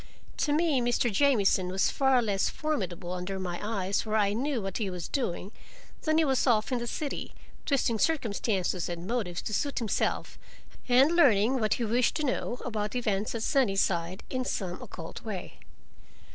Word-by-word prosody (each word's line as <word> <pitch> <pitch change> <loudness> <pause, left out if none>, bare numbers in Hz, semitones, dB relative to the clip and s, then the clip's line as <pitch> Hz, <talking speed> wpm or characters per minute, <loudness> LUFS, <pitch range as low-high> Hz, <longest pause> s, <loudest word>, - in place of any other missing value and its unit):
To 295 - +1
me 300 -3 +2
Mr. 240 0 +1
Jamieson 205 -8 +3
was 190 +1 +1
far 265 -3 +3
less 200 -3 +1
formidable 190 - -3
under 180 +2 -3
my 175 -2 -4
eyes 200 -2 -1
where 215 -1 -2
I 205 -2 +3
knew 265 +3 -1
what 195 -1 -4
he 205 -3 -1
was 180 -2 -5
doing, 200 -7 -2 0.5
than 310 0 +1
he 320 - +4
was 270 -1 +1
off 225 0 +3
in 250 - +1
the 240 - -4
city, 290 +4 -4 0.3
twisting 245 -6 +1
circumstances 200 - 0
and 170 0 -5
motives 195 -6 -2
to 215 - -4
suit 285 +6 -1
himself 230 -4 -1 0.5
and 260 +5 +6
learning 255 - +4
what 215 -2 +2
he 235 - -2
wished 235 +3 +2
to 310 - -1
know, 250 -2 -1
about 215 -2 -3
events 215 -3 -1
at 225 - -2
Sunnyside, 195 - +1
in 255 -1 -1
some 185 -7 -3
occult 165 -2 -8
way. 205 -6 -6
220 Hz, 170 wpm, -29 LUFS, 195-260 Hz, 0.5 s, and